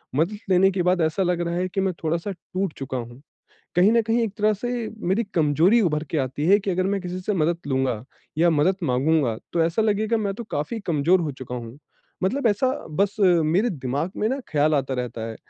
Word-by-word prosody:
मदद 170 Hz, +9 st, +1 dB
लेने 190 Hz, +1 st, +5 dB
के 185 Hz, -1 st, -1 dB
बाद 180 Hz, 0 st, +2 dB
ऐसा 160 Hz, +4 st, +1 dB
लग 175 Hz, -1 st, 0 dB
रहा 170 Hz, -, -2 dB
है 180 Hz, +1 st, 0 dB
कि 195 Hz, -, -1 dB
मैं 190 Hz, -1 st, 0 dB
थोड़ा-सा 170 Hz, +5 st, -1 dB
टूट 185 Hz, -1 st, -4 dB
चुका 135 Hz, -1 st, -4 dB
हूँ। 120 Hz, +1 st, -7 dB, 0.6 s
कहीं 190 Hz, +5 st, +5 dB
न 230 Hz, -1 st, +4 dB
कहीं 230 Hz, +1 st, +2 dB
एक 220 Hz, -4 st, -1 dB
तरह 215 Hz, +1 st, +3 dB
से 240 Hz, +2 st, -3 dB, 0.2 s
मेरी 215 Hz, +5 st, +2 dB
कमजोरी 165 Hz, +8 st, +4 dB
उभर 150 Hz, -5 st, 0 dB
के 160 Hz, -, 0 dB
आती 135 Hz, +3 st, -2 dB
है 200 Hz, +2 st, +6 dB
कि 195 Hz, -, -2 dB
अगर 185 Hz, +1 st, 0 dB
मैं 200 Hz, 0 st, 0 dB
किसी 180 Hz, 0 st, -5 dB
से 210 Hz, -, -2 dB
मदद 170 Hz, 0 st, +1 dB
लूँगा 130 Hz, -4 st, -1 dB, 0.3 s
या 170 Hz, +1 st, +5 dB
मदद 165 Hz, +5 st, +2 dB
मांगूँगा 135 Hz, -3 st, +1 dB, 0.2 s
तो 170 Hz, -, +2 dB
ऐसा 165 Hz, +7 st, +1 dB
लगेगा 215 Hz, +1 st, +1 dB
मैं 200 Hz, -3 st, -1 dB
तो 235 Hz, -, -7 dB
काफ़ी 150 Hz, +11 st, -3 dB
कमजोर 170 Hz, +3 st, +3 dB
हो 155 Hz, -3 st, -2 dB
चुका 130 Hz, -1 st, -8 dB
हूँ, 120 Hz, +2 st, -7 dB, 0.5 s
मतलब 250 Hz, +6 st, 0 dB
ऐसा 220 Hz, +4 st, +2 dB, 0.2 s
बस 200 Hz, +6 st, 0 dB
मेरे 180 Hz, +4 st, +3 dB
दिमाग 140 Hz, +2 st, -3 dB
में 215 Hz, -, 0 dB
ना 265 Hz, +3 st, -2 dB
ख़्याल 150 Hz, +1 st, +2 dB
आता 135 Hz, -2 st, 0 dB
रहता 120 Hz, -2 st, -4 dB
है 110 Hz, -, -8 dB
175 Hz, 220 wpm, -24 LUFS, 145-200 Hz, 0.6 s, है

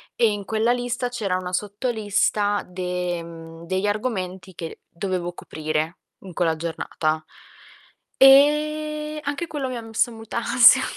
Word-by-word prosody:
e 230 Hz, -2 st, +4 dB
in 205 Hz, -1 st, -4 dB
quella 220 Hz, +2 st, +1 dB
lista 245 Hz, 0 st, -1 dB
c'era 215 Hz, -7 st, -1 dB
una 180 Hz, -1 st, -5 dB
sotto 205 Hz, +6 st, -2 dB
lista 205 Hz, -1 st, +1 dB
de 180 Hz, -1 st, -3 dB
mhmm, 165 Hz, 0 st, -11 dB
degli 190 Hz, +3 st, 0 dB
argomenti 190 Hz, -4 st, -3 dB
che 165 Hz, -1 st, -7 dB
dovevo 175 Hz, 0 st, -3 dB
coprire 155 Hz, +1 st, -3 dB, 0.2 s
in 190 Hz, -2 st, -11 dB
quella 165 Hz, -1 st, +1 dB
giornata. 155 Hz, -1 st, -2 dB, 0.9 s
E 300 Hz, +2 st, +4 dB
anche 290 Hz, +4 st, -3 dB
quello 290 Hz, -4 st, -3 dB
mi 255 Hz, -, -4 dB
ha 235 Hz, -, -5 dB
messo 225 Hz, +1 st, 0 dB
molta 225 Hz, 0 st, -7 dB
ansia. 235 Hz, +1 st, +7 dB
205 Hz, 140 wpm, -23 LUFS, 175-245 Hz, 0.9 s, ansia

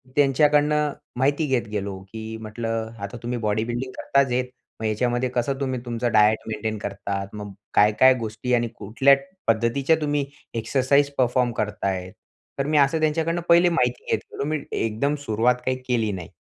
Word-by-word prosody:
त्यांच्याकडनं 150 Hz, +1 st, +3 dB, 0.2 s
माहिती 145 Hz, +4 st, +2 dB
घेत 125 Hz, -4 st, 0 dB
गेलो, 100 Hz, -2 st, -3 dB
की 110 Hz, 0 st, -6 dB
म्हटलं 115 Hz, 0 st, -3 dB
आता 100 Hz, +4 st, -6 dB
तुम्ही 120 Hz, 0 st, -2 dB
बॉडी 110 Hz, 0 st, 0 dB
बिल्डिंग 120 Hz, +2 st, -3 dB
करताच 140 Hz, -2 st, +2 dB
आहेत. 125 Hz, +1 st, +1 dB, 0.3 s
मग 110 Hz, -, -4 dB
ह्याच्यामध्ये 120 Hz, +3 st, 0 dB
कसं 125 Hz, +2 st, -1 dB
तुम्ही 130 Hz, -2 st, -2 dB
तुमचा 120 Hz, 0 st, -2 dB
डायट 110 Hz, 0 st, +4 dB
मेंटेन 110 Hz, 0 st, -3 dB
करता. 100 Hz, -1 st, -4 dB
मग 105 Hz, -1 st, -7 dB, 0.2 s
काय, 105 Hz, +1 st, +5 dB
काय 130 Hz, 0 st, +8 dB
गोष्टी 115 Hz, +3 st, -3 dB
आणि 120 Hz, -1 st, +2 dB
कुठल्या 125 Hz, +7 st, +4 dB, 0.3 s
पद्धतीच्या 115 Hz, +7 st, +2 dB
तुम्ही 145 Hz, -1 st, 0 dB, 0.3 s
एक्सरसाइज 135 Hz, +4 st, +2 dB
परफॉर्म 125 Hz, -1 st, +2 dB
करताय? 95 Hz, -3 st, -3 dB, 0.5 s
तर 140 Hz, -, +1 dB
मी 150 Hz, 0 st, +2 dB
असं 145 Hz, +3 st, +4 dB
त्यांच्याकडनं 160 Hz, +2 st, 0 dB
पहिले 175 Hz, +1 st, +6 dB
माहिती 125 Hz, -7 st, 0 dB
घेत -, -, +2 dB
गेलो. -, -, -3 dB
मी 155 Hz, 0 st, -1 dB
एकदम 115 Hz, +7 st, 0 dB
सुरुवात 115 Hz, +2 st, +2 dB
काही 130 Hz, 0 st, 0 dB
केली 115 Hz, -4 st, +1 dB
नाही. 90 Hz, -4 st, -7 dB
120 Hz, 165 wpm, -24 LUFS, 110-140 Hz, 0.5 s, काय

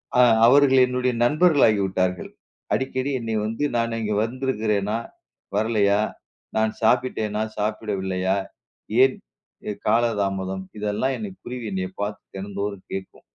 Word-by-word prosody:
அ 125 Hz, -, +6 dB, 0.2 s
அவர்கள் 135 Hz, +1 st, +6 dB
என்னுடைய 125 Hz, 0 st, 0 dB
நண்பர்கள் 155 Hz, +4 st, +4 dB
ஆகிவிட்டார்கள். 95 Hz, -3 st, 0 dB, 0.4 s
அடிக்கடி 130 Hz, +1 st, -1 dB
என்னை 115 Hz, -1 st, -3 dB
வந்து 115 Hz, +6 st, -3 dB
நான் 115 Hz, 0 st, 0 dB
அங்கு 110 Hz, -2 st, -1 dB
வந்திருக்கிறேனா? 110 Hz, -4 st, -1 dB, 0.6 s
வரலையா? 105 Hz, -1 st, +2 dB, 0.6 s
நான் 110 Hz, 0 st, +2 dB
சாப்பிட்டேனா? 110 Hz, -2 st, +1 dB, 0.2 s
சாப்பிடவில்லையா? 100 Hz, -3 st, -1 dB, 0.7 s
ஏன் 135 Hz, 0 st, +3 dB, 0.5 s
எ -, -, -1 dB
காலதாமதம். 100 Hz, -4 st, 0 dB
இதெல்லாம் 105 Hz, +6 st, 0 dB
என்னை 210 Hz, -3 st, -5 dB
குருவி 125 Hz, -1 st, -6 dB
என்னை 95 Hz, -1 st, -1 dB
பார்த்து 105 Hz, 0 st, -4 dB
தினந்தோறும் 100 Hz, 0 st, -5 dB
கேட்கும். 95 Hz, 0 st, -6 dB
110 Hz, 110 wpm, -24 LUFS, 100-125 Hz, 0.7 s, அ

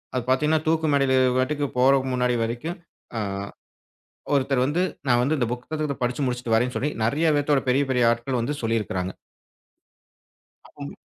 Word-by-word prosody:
அது 125 Hz, -, 0 dB
பாத்தீங்கன்னா, 150 Hz, +4 st, +2 dB
தூக்கு 160 Hz, 0 st, +2 dB
மேடைல 135 Hz, -2 st, +3 dB
அதுபாட்டுக்கு 130 Hz, +3 st, +1 dB
போற 130 Hz, +2 st, +5 dB, 0.2 s
முன்னாடி 125 Hz, -1 st, +1 dB
வரைக்கும், 120 Hz, +10 st, -4 dB, 0.4 s
அ -, -, 0 dB, 1.1 s
ஒருத்தர் 135 Hz, -2 st, +2 dB
வந்து 160 Hz, +6 st, 0 dB, 0.3 s
நான் 120 Hz, -1 st, +4 dB
அந்தப் 130 Hz, -4 st, 0 dB
புத்தகத்தைப் 140 Hz, +3 st, -4 dB
படிச்சு 125 Hz, +3 st, -1 dB
முடிச்சுட்டு 125 Hz, -2 st, -2 dB
வரேன்னு 125 Hz, +3 st, +1 dB
சொல்லி 145 Hz, -, 0 dB
நிறைய 155 Hz, +7 st, +2 dB
பேத்தோட 145 Hz, -1 st, +2 dB
பெரிய 135 Hz, +3 st, +3 dB
பெரிய 125 Hz, -2 st, +3 dB
ஆட்கள் 120 Hz, +2 st, -2 dB
வந்து 135 Hz, +6 st, -2 dB
சொல்லி 115 Hz, 0 st, +1 dB
இருக்காங்க. 95 Hz, -3 st, -3 dB, 1.5 s
ஆமா. -, -, -9 dB
130 Hz, 145 wpm, -24 LUFS, 120-145 Hz, 1.5 s, போற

